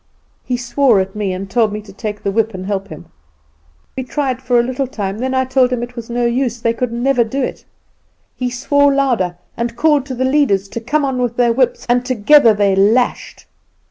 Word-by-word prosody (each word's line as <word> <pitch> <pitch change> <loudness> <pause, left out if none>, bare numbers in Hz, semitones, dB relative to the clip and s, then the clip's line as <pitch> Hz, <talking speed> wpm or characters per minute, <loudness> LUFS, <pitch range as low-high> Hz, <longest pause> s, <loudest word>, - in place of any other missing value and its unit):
He 250 - -2
swore 240 -2 +2
at 190 +1 -3
me, 205 -2 -2
and 185 +1 -5
told 215 +2 +1
me 210 - -4
to 200 -2 -14
take 210 0 -6
the 200 - 0
whip 220 0 0
and 185 0 -6
help 200 0 -3
him. 155 -6 -10 0.9
We 265 - -3
tried 260 -1 -2
for 250 -2 +2
a - - +3
little 255 +2 -2
time, 205 -5 -4
then 260 +1 -2
I 260 0 +2
told 260 -1 +2
him 245 -1 -1
it 240 0 -8
was 235 -1 -8
no 240 0 -1
use, 240 0 -1
they 230 0 0
could 245 0 -3
never 245 +1 +1
do 260 +4 -3
it. - - -5 0.7
He 250 -1 -2
swore 285 +3 +2
louder 240 -11 0 0.2
and 235 0 -3
called 290 +1 +2
to 260 - -5
the 260 +1 -1
leaders 260 -9 +2
to 230 - -5
come 295 +5 0
on 260 -2 -2
with 240 -1 -2
their 240 -1 +3
whips, 255 0 0
and 245 +1 +2
together 250 +1 +5
they 200 -2 +2
lashed. 220 +6 +1
240 Hz, 220 wpm, -17 LUFS, 210-260 Hz, 0.9 s, together